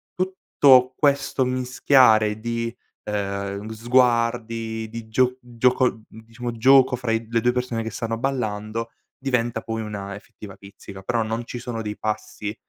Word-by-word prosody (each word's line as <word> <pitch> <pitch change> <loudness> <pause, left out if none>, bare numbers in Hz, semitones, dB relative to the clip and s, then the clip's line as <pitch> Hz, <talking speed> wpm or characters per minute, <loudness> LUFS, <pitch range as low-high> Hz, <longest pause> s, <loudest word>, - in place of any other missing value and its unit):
tutto 140 -9 +3
questo 140 -2 +1
mischiare 125 -4 +3
di, 115 +1 -3 0.3
ehm, 100 0 -3
sguardi, 115 -1 +1
di 115 0 -8
gio 125 +2 +2
gioco, 125 +1 +2 0.2
mhmm, 110 - -14
diciamo 120 +2 -5
gioco, 130 +2 +5
fra 125 -2 -3
i 115 0 -1
le 115 - +2
2 125 +2 +3
persone 125 -2 -2
che 110 - -4
stanno 115 -1 -3
ballando 115 -3 -3 0.3
diventa 120 -3 -1
poi 115 0 -4
una 100 -2 -6
effettiva 100 -1 -12
pizzica, 100 0 -12
però 115 +4 0
non 115 +2 -3
ci 120 - -6
sono 120 -1 -5
dei 105 -1 -5
passi 105 0 -4
115 Hz, 145 wpm, -23 LUFS, 110-125 Hz, 0.3 s, gioco